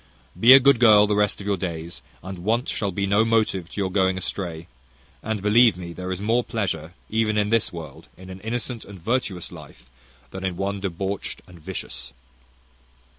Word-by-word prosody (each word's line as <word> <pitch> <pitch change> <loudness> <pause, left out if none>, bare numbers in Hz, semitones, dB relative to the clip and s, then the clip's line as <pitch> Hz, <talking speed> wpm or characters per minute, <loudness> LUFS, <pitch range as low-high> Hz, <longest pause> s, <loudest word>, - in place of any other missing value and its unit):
Be 120 +3 +7
a 135 - +10
good 135 -2 +4
girl 105 -3 +7
the 105 0 0
rest 105 0 +1
of 100 - -8
your 100 -1 0
days, 85 -2 -5 0.2
and 95 -1 -7
want 115 +7 0
shall 100 - -1
be 100 +2 -1
no 100 +3 +3
motive 110 -6 0
to - - -7
your 95 -2 -1
going 95 -1 +2
astray; 85 -3 -4 0.6
and, 110 -2 -3
believe 110 -1 +5
me, 85 -2 -7
there 90 +1 -6
is 95 - -3
more 115 +4 +1
pleasure, 90 -9 -3
even 110 -1 0
in 105 0 +1
this 115 -1 +2
world, 80 -2 -9
in 95 0 -11
an 95 - -9
innocent 120 +1 -4
and 100 -2 -12
virtuous 100 -3 -2
life, 65 +2 -14 0.4
than 95 - -7
in 95 -2 -2
one 100 +1 -2
debauched 95 +1 -4
and 90 -1 -15
vicious. 75 - -6
100 Hz, 190 wpm, -23 LUFS, 90-110 Hz, 0.6 s, a